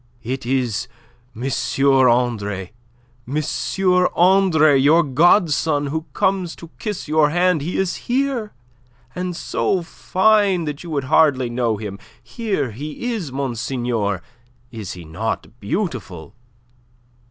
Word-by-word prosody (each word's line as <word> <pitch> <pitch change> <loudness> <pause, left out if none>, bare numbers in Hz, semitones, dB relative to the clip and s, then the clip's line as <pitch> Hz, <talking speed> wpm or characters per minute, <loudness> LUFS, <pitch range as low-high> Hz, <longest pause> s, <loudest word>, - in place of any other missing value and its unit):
"It 130 +1 -4
is 125 -5 0 0.5
M. 120 - -7 0.6
Andre... 105 -6 0 0.6
M. 150 +4 -1 0.7
Andre, 175 -5 +5
your 150 +5 +5
godson, 155 0 +3
who 160 0 -3
comes 190 -3 0
to 165 -1 -12
kiss 210 -7 -4
your 155 0 +3
hand. 175 0 +2
He 165 +5 -3
is 190 -2 0
here... 250 -4 -1 0.6
and 180 -1 -3
so 180 +1 -1
fine 195 0 +2
that 150 0 -5
you 175 - -8
would 145 -4 -1
hardly 130 -3 +3
know 120 -3 0
him. 100 -2 -6 0.2
Here 195 - -2
he 150 - -5
is, 180 - -4
monseigneur! 120 -6 -2 0.5
Is 110 -5 -6
he 90 -2 -10
not 110 +8 -4
beautiful?" 105 - -4
145 Hz, 120 wpm, -20 LUFS, 120-180 Hz, 0.7 s, Andre